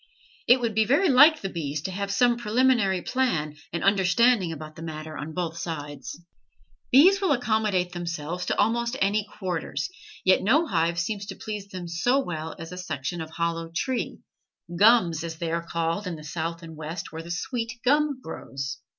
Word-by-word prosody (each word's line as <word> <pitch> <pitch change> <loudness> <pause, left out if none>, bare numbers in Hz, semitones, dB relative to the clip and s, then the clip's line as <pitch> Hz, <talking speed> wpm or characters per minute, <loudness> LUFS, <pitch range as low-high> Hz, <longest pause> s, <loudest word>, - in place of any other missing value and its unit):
It 250 +2 +7
would 230 -2 -1
be 220 +1 +4
very 285 - +3
like 295 +4 +7
the 195 - -2
bees 155 -4 -3
to 190 - -3
have 200 +1 -3
some 245 +2 +4
preliminary 235 -5 +2
plan 170 - 0 0.2
and 170 - -3
understanding 195 +1 +3
about 155 0 -8
the - - -10
matter 155 -1 -6
on 155 +2 -5
both 170 -2 -2
sides. 145 -5 -6 0.7
Bees 370 +10 +7
will 375 -6 +3
accommodate 215 -7 +1
themselves 175 0 -4
to - - 0
almost 235 +4 +1
any 205 +2 +1
quarters, 185 - -3 0.3
yet 185 0 +5
no 280 - +3
hive 170 - 0
seems 200 +3 -2
to 195 - -6
please 210 -1 -6
them 185 -3 -7
so 185 +11 +1
well 160 - -3
as 165 +1 -8
a 180 - -7
section 160 -1 -4
of 160 - -6
a - - -17
hollow 165 0 -2
tree 245 +10 -2 0.6
"gums" 190 -5 +5
as 165 -1 -5
they 165 -1 -3
are 170 0 -2
called 170 +4 -1
in 175 - -3
the 155 - -10
South 165 +2 -4
and 165 -1 -9
West 155 +3 -6
where 160 - -6
the 165 - -11
sweet 230 +6 -3
gum 290 0 +3
grows. 135 -4 -6
180 Hz, 185 wpm, -26 LUFS, 165-230 Hz, 0.7 s, It